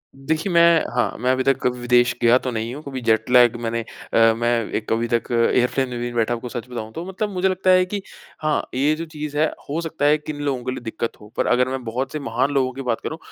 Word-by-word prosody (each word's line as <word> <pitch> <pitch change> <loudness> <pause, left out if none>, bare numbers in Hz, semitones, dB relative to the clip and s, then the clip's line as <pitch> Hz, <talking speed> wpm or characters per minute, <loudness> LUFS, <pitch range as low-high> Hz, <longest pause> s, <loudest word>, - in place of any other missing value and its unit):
देखिए, 155 +7 -2
मैं 170 -1 +6
हाँ, 120 - +1
मैं 125 +2 +2
अभी 130 0 +1
तक 135 -1 +1
विदेश 120 0 +2
गया 120 +1 +6
तो 130 - -3
नहीं 115 +1 -3
हूँ। 150 - -8
कभी 135 -2 -6
जेट 110 -1 +1
लैग 125 -2 +6
मैंने 115 0 -1
अ, 115 0 +1
मैं 120 +1 0 0.3
एक 110 - -3
अभी 115 +1 0
तक 115 0 0
एयरप्लेन 125 +2 +2
में 120 0 -4
बैठा 120 0 +1
हूँ, 120 +1 -5 0.4
तो 165 - -5
मतलब 190 +3 -3
मुझे 185 +1 +1
लगता 185 0 0
है 185 0 +6
कि 200 +2 -4 0.4
हाँ, 155 -1 +1
ये 145 +4 +2
जो 165 - -5
चीज़ 150 -2 -6
है, 155 - +4 0.2
हो 150 +3 -1
सकता 160 -3 -2
है 150 +1 +5
किन 150 0 -7
लोगों 135 -4 -1
के 130 - -2
लिए - - -5
दिक्कत 115 +1 -3
हो। 105 - -12
पर - - +1
अगर 125 +1 +3
मैं 130 -1 -4
बहुत 125 +4 -3
से 155 - -4
महान 130 0 -1
लोगों 130 -2 +1
की 135 - -6
बात 120 -4 -2
करूँ। 160 - -4
130 Hz, 245 wpm, -22 LUFS, 120-150 Hz, 0.4 s, मैं